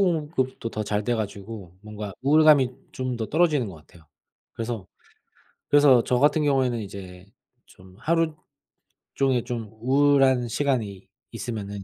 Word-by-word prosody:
공급도 150 -9 -1
더 110 - -3
잘 105 0 -1
돼 120 - +1
가지고 100 -3 -6
뭔가 105 -2 -7
우울감이 145 -2 +5 0.2
좀 130 -1 -3
더 115 -1 -3
떨어지는 150 -6 +2
것 90 - -10
같아요. 80 +1 -19 0.5
그래서 115 -4 -5 0.8
그래서 145 -5 +6
저 125 -1 +1
같은 150 +2 +3
경우에는 130 -4 +1
이제 95 -3 -9 0.4
좀 95 0 -18
하루 165 0 +1 0.8
종일 130 -3 +1
좀 115 -4 -5
우울한 135 -1 +3
시간이 115 -7 -2 0.2
있으면은 100 -4 -5
120 Hz, 285 characters per minute, -25 LUFS, 105-140 Hz, 0.8 s, 그래서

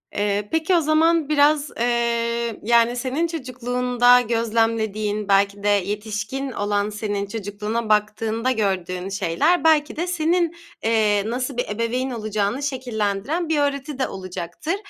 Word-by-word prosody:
Eee, 205 0 -1
peki 325 +3 +2
o 335 - +4
zaman 310 0 +2
biraz, 295 0 +3
eee, 235 -1 0
yani, 235 +2 +3
senin 265 +7 -1
çocukluğunda 250 -4 +2
gözlemlediğin, 220 -2 0
belki 200 0 +2
de 205 - 0
yetişkin 210 +7 -2
olan 205 -1 -1
senin 205 -1 -3
çocukluğuna 210 +2 -4
baktığında 215 +3 +1
gördüğün 190 -4 -2
şeyler 200 - +1
belki 310 -2 +3
de 345 +3 -2
senin, 340 0 +1 0.3
eee, 215 -3 +2
nasıl 250 +3 -3
bir 245 - -1
ebeveyn 230 +5 -1
olacağını 215 +2 -2
şekillendiren 255 - -2
bir 310 -2 +2
öğreti 280 -1 -2
de 260 - +1
olacaktır. 185 - -5
230 Hz, 130 wpm, -22 LUFS, 205-275 Hz, 0.3 s, o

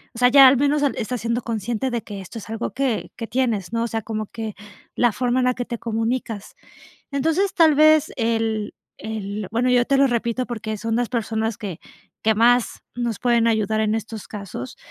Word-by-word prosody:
o - - -7
sea, 250 0 +6
ya 270 +1 +9
al 260 - +6
menos 290 +2 +2
han 285 - +1
estás 245 +2 -3
siendo 235 +1 -1
consciente 230 +2 -2
de 235 -1 -1
que 200 -2 -7
esto 190 +5 -8
es 215 - -11
algo 225 +1 -3
que 265 -5 -1
que 230 - -5
tienes, 230 -7 -1
¿no? 230 0 +1
O - - -1
sea, 225 -1 -3
como 215 -1 -4
que 220 -1 -6 0.4
la 240 -1 +3
forma 250 +1 0
en 255 - +2
la 250 - +3
que 245 - -3
te 235 -1 -5
comunicas. 225 -2 -3 0.6
Entonces, 325 +8 +1
tal 325 -4 +6
vez, 310 0 +5
el 225 -2 -1 0.3
el 210 -2 -5
bueno, 240 +3 +1
yo 245 -1 +4
te 275 - +2
lo 275 0 +5
repito, 235 0 -1
porque 220 -2 -4
son 225 +2 -2
las 245 0 0
personas 225 -2 -2
que 190 -5 -6 0.4
que 220 0 +3
más 240 +2 +3
nos 240 -3 -2
pueden 235 -2 +3
ayudar 220 -1 +1
en 215 0 +1
estos 220 -1 -6
casos. 200 - -7
230 Hz, 210 wpm, -22 LUFS, 220-250 Hz, 0.6 s, ya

